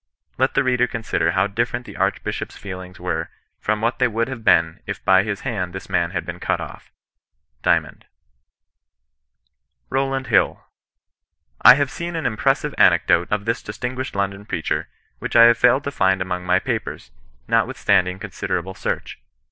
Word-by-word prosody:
Let 130 +1 +1
the 135 - +3
reader 125 -1 +2
consider 105 -8 -1
how 95 +1 +2
different 115 +4 -2
the - - -11
Archbishop's - - -2
feelings 95 -2 -8
were - - -3 0.3
from 110 0 -1
what 115 +2 0
they 125 - +4
would 115 +2 -1
have 125 -4 -7
been 80 -5 +3
if - - -6
by 95 0 +6
his 100 0 -4
hand 90 -6 -3
tms 95 - -8
man 85 -2 +1
had 90 -2 -4
been 90 -1 -7
cut - - -1
off." - - -9 0.3
— - - -51
Dymond, - - 0 1.8
ROWLAND 135 0 0
HILL. - - +1 1.0
I 125 - +10
have 140 -2 0
seen 170 0 -5
an 160 - -3
impressive 110 - 0
anecdote 85 - +4
of 105 -1 -1
this 115 +1 -1
distinguished 125 +4 -5
London 100 0 -2
preacher, - - -2 0.3
which - - -5
I 115 - +9
have 115 0 +6
failed 130 +3 +4
to 140 - -3
find 95 -6 +2
among 90 -1 -3
my 90 - +4
papers, 65 - -4 0.4
notwithstanding 90 0 +2
considerable 95 -1 -4
search. - - -4
105 Hz, 165 wpm, -21 LUFS, 95-125 Hz, 1.8 s, I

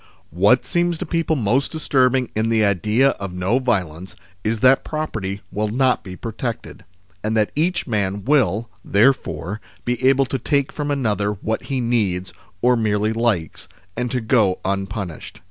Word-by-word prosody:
What 100 +10 +3
seems 175 -1 0
to 185 - -4
people 165 -1 0
most 125 +2 +1
disturbing 130 -5 +1
in 110 +1 +1
the 110 -2 +3
idea 105 +7 +3
of 100 -2 -5
no 95 +8 +1
violence, 95 -8 -2 0.3
is 110 0 -1
that 135 +1 +5
property 110 -11 -4
will 105 +1 -1
not 125 +4 +1
be 95 -1 -8
protected, 115 +3 -5 0.4
and 110 +1 0
that 105 -1 +2
each 170 +5 0
man 100 -3 -2
will, 115 -6 +2 0.2
therefore, 105 - +1 0.2
be 125 0 -2
able 135 0 +3
to 130 0 -3
take 140 +2 0
from 145 -1 -4
another 105 -7 0
what 110 +2 -3
he 135 -2 -2
needs 100 -6 0 0.3
or 125 0 +5
merely 110 -1 +1
likes, 110 -9 -1 0.3
and 125 +1 -2
to 125 +1 -1
go 110 -5 +2
unpunished. 95 -2 -4
110 Hz, 160 wpm, -21 LUFS, 100-130 Hz, 0.4 s, that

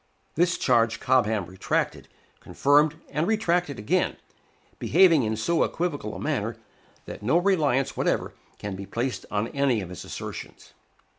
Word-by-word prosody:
This 170 +1 +2
charge 115 -2 +2
Cobham 110 -6 +2
retracted, 95 +2 -2 0.3
confirmed, 145 +2 +3 0.2
and 150 +4 0
retracted 180 - +1
again, 105 - 0 0.6
behaving 170 -2 +5
in 110 -2 -1
so 160 +10 +1
equivocal 145 -11 -3
a - - -6
manner, - - -2 0.5
that - - -8
no 125 +11 +2
reliance 155 -8 +2
whatever - - 0 0.2
can 100 -2 -5
be 95 +1 -8
placed 120 +6 -3
on 105 +2 -1
any 140 -5 +1
of 95 -4 -6
his 90 - -8
assertions. - - -8
135 Hz, 140 wpm, -26 LUFS, 110-165 Hz, 0.6 s, behaving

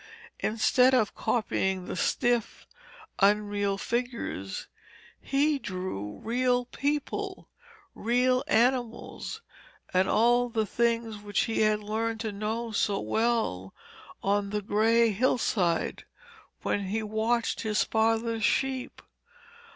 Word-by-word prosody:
Instead 250 +4 +3
of 220 -5 +2
copying 190 -5 -1
the - - -5
stiff, 240 +5 0 0.5
unreal 205 0 +2
figures, 235 - -3 0.6
he 285 +1 +1
drew 180 - -5
real 245 +1 +1
people, 290 +3 -3 0.4
real 250 +3 +2
animals, 245 - 0 0.5
and 185 +1 +3
all 240 +3 +3
the 225 -2 0
things 230 0 0
which 205 -1 -1
he 225 - -1
had 215 0 +3
learned 220 +2 -2
to 220 -1 -3
know 220 +3 -3
so 205 -1 +1
well 220 - -1 0.5
on 200 0 +1
the 210 0 -2
grey 225 +3 +3
hillside, 200 -6 0 0.6
when 200 -1 -1
he 215 +4 -2
watched 220 +2 0
his 215 -2 +1
father's 225 0 +1
sheep. 265 +3 0
225 Hz, 105 wpm, -28 LUFS, 205-240 Hz, 0.6 s, Instead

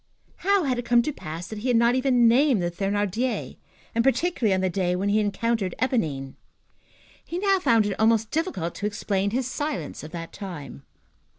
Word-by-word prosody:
How 395 0 +2
had 255 -4 0
it 245 - -5
come 240 0 +4
to 300 - -2
pass 165 - -7
that 215 +2 -7
he 235 - -4
had 245 -2 +4
not 235 +1 +4
even 255 -2 +3
named 255 0 +4
the 175 - -1
Thénardiers, 205 +6 -2 0.4
and, 230 - +2
particularly, 270 - +1
on 190 -1 +2
the 190 - +1
day 180 0 0
when 195 +3 -1
he 205 - +3
had 210 -1 +2
encountered 205 -2 -1
Éponine? 155 - -1 0.9
He 340 - -5
now 390 0 +2
found 230 - +3
it 205 -2 -3
almost 220 0 +3
difficult 300 - -2
to 205 - -3
explain 200 -1 -1
his 250 +4 -1
silence 265 - -4
of 155 - -7
that 165 0 -7
time. 165 - -8
220 Hz, 195 wpm, -25 LUFS, 190-255 Hz, 0.9 s, come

